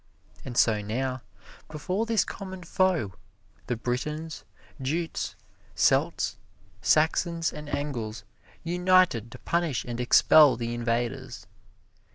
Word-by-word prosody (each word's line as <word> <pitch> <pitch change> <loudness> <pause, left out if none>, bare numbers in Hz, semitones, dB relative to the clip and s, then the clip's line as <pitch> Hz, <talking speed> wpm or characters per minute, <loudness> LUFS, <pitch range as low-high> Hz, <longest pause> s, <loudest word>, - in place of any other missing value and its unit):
And 120 -3 -7
so 110 -2 +4
now, 130 +4 -3 0.5
before 185 +8 -2
this 225 -3 +2
common 190 -2 -7
foe, 165 - +1 0.5
the 120 - 0
Britons, 150 +7 -4 0.4
Jutes, 160 +5 -2 0.4
Celts, - - +2 0.4
Saxons 165 +2 +2
and 150 -1 -8
Engles 115 -8 -4 0.4
united 180 - +3
to - - -9
punish 170 -6 -1
and 120 -1 -5
expel 135 +3 +6
the 120 0 -3
invaders. 120 -1 -3
145 Hz, 105 wpm, -27 LUFS, 120-170 Hz, 0.5 s, expel